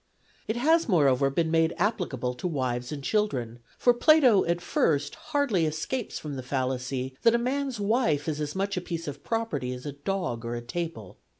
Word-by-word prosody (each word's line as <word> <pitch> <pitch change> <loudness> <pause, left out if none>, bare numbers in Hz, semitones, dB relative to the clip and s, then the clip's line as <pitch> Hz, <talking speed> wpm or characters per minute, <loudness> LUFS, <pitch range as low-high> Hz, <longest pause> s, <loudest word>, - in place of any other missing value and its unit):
It 220 - -1
has, 320 +5 +3
moreover, 140 -6 +4
been 160 +3 0
made 165 0 +2
applicable 170 - -1
to 125 +9 -4
wives 125 -5 -2
and 145 -2 -5
children, 130 - -1 0.2
for 245 - +4
Plato 255 -5 +5
at 170 +1 0
first 145 -4 +1
hardly 230 - 0
escapes 160 +11 -3
from 145 -3 -6
the - - -4
fallacy 130 0 -2
that 230 0 +5
a - - +4
man's 260 0 -2
wife 200 - +1
is 155 -1 -2
as 150 +2 -3
much 200 +1 -1
a 180 - -1
piece 170 -2 -5
of 145 0 -6
property 225 - -2
as 125 +2 -9
a 145 - -3
dog 145 -4 -3
or 120 +1 -3
a 120 - -4
table. 125 - -5
160 Hz, 190 wpm, -27 LUFS, 130-210 Hz, 0.2 s, Plato